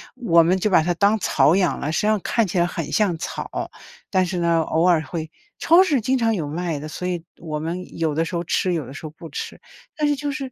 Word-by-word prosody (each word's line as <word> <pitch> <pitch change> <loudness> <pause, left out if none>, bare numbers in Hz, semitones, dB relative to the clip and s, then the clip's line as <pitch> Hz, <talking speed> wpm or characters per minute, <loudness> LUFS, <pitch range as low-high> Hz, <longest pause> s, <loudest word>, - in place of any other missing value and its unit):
我 170 -8 +4
们 180 +3 +3
就 210 +3 0
把 175 - +5
它 175 +1 +1
当 200 +5 +2
草 155 -3 +3
养 180 -3 +1
了， 150 - -2
实 - - 0
际 210 - 0
上 215 0 +3
看 230 -4 +1
起 185 - -3
来 170 - +4
很 165 -3 -4
像 195 -6 +2
草。 - - -5 0.4
但 185 -2 +2
是 180 0 -3
呢， 170 -1 +2
偶 160 +2 +1
尔 170 -3 +4
会 160 -2 -5 0.3
超 340 +3 +6
市 300 -8 +1
经 260 +4 +1
常 225 -2 +1
有 155 -5 -3
卖 165 -1 -3
的， 155 - -7
所 180 +3 -5
以 175 -2 -3
我 155 -3 -5
们 175 +3 -5
有 160 -2 0
的 165 +2 0
时 175 - -5
候 170 - -1
吃， 180 +1 0
有 160 -5 -2
的 135 - -10
时 155 - -9
候 - - -5
不 165 0 -11
吃， - - -6 0.3
但 300 - 0
是 290 - +2
就 290 0 -3
是 270 -3 -5
175 Hz, 285 characters per minute, -22 LUFS, 160-210 Hz, 0.4 s, 超